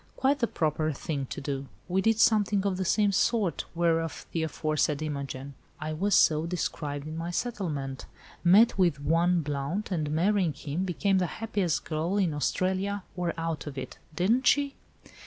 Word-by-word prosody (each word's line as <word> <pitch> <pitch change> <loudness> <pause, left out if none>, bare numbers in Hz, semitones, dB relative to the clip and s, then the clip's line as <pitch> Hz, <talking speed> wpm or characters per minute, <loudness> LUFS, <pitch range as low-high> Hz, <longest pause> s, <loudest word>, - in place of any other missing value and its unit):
"Quite 280 +2 +2
the 235 - +2
proper 155 -2 0
thing 140 -1 -4
to - - -5
do. 140 -1 -4 0.2
We 185 +2 +1
did 225 +1 +2
something 205 -3 +3
of 195 -2 0
the 190 - -1
same 205 +3 +3
sort, 200 -1 +1
whereof 165 -1 0
the 165 - -1
aforesaid 155 -1 0
Imogen 140 -2 -5 0.3
(I 155 +1 -3
was 195 +5 +1
so 155 +1 +4
described 150 -4 -3
in 155 - -6
my 165 +1 -4
settlement) 160 - -3 0.4
met 200 +5 +6
with 170 -7 +3
one 165 +4 +2
Blount, 150 +9 -3
and 155 -5 -1
marrying 175 +2 +2
him, 150 +6 -3
became 190 +2 +1
the 180 - +1
happiest 205 -7 -1
girl 165 +5 -1
in 185 -6 +2
Australia 190 +7 -1
or 175 -2 -2
out 165 -2 -3
of 140 -1 -7
it. - - -6 0.2
Didn't 225 +10 +2
she?" 285 -1 +3
170 Hz, 170 wpm, -28 LUFS, 150-195 Hz, 0.4 s, met